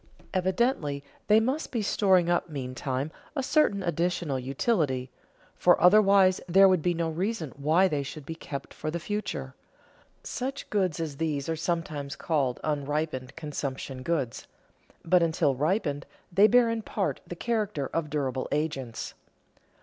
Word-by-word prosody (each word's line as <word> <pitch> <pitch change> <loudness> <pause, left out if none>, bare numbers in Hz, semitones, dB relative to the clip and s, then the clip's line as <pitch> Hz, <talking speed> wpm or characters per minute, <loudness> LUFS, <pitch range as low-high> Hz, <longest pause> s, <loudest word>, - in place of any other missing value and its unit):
Evidently 185 - 0 0.2
they 215 +1 +6
must 260 +8 -1
be 230 -4 -1
storing 190 -4 +3
up 175 0 +1
meantime 130 0 -3 0.2
a 275 - -1
certain 260 -8 +2
additional 170 -5 -1
utility, 135 - 0 0.4
for - - +4
otherwise 195 0 +6
there 195 +3 +7
would 185 -3 +3
be 175 +2 +1
no 165 0 0
reason 170 - -2
why 155 +7 +3
they 150 -5 -1
should 140 +1 -7
be 165 - -5
kept 140 -4 -7
for 155 - -4
the 170 +2 -3
future. 210 +5 -4 0.7
Such 270 +2 -4
goods 185 -7 +1
as 155 -4 -4
these 150 -3 -1
are 165 - 0
sometimes 155 -4 -3
called 140 -7 0
unripened 145 -3 -2
consumption 135 -3 -5
goods, 135 -5 -2 0.6
but 180 +1 +4
until 160 -4 +2
ripened 145 - -1 0.2
they 195 +4 +6
bear 245 +1 +5
in 230 0 -1
part 205 -2 -2
the 175 - -6
character 210 - -1
of 165 -2 -1
durable 135 -3 -2
agents. 135 -6 -3
165 Hz, 145 wpm, -28 LUFS, 140-195 Hz, 0.7 s, there